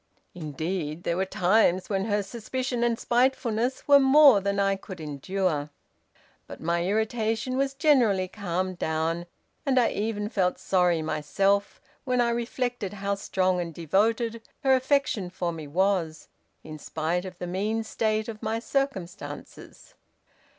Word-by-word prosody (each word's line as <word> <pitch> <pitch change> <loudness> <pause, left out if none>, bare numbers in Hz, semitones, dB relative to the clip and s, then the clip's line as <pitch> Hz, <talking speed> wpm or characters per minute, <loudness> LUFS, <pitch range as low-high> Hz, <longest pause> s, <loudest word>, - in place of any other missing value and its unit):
Indeed, 160 +1 -4
there 170 - 0
were 190 +1 -1
times 185 -1 +2
when 195 -1 -1
her 205 -2 0
suspicion 240 +4 -3
and 235 -1 +1
spitefulness 245 0 0
were 285 -1 +8
more 270 -5 +7
than 200 +1 -1
I 195 0 +2
could 190 -2 -10
endure. 155 +1 -2 0.8
But - - -9
my 170 +1 0
irritation 220 +4 -1
was 270 0 0
generally 245 - +3
calmed 185 -2 -3
down, 160 +2 -1 0.4
and 265 -3 +3
I 235 - +3
even 210 -1 -2
felt 185 -4 0
sorry 180 -4 +2
myself, 195 +7 0 0.2
when 250 -1 0
I 235 -1 +3
reflected 240 -3 -2
how 200 0 -2
strong 185 -2 0
and 170 -1 -4
devoted 225 - 0 0.2
her 265 -1 +5
affection 260 -6 +1
for 175 -1 -3
me 160 -3 -7
was, 175 -1 0 0.3
in 155 -1 -9
spite 160 +4 -2
of 185 -2 -8
the 180 - -5
mean 210 +5 -1
state 215 0 -1
of 220 -2 -7
my 220 0 -1
circumstances. 260 -7 -5
200 Hz, 145 wpm, -26 LUFS, 175-235 Hz, 0.8 s, were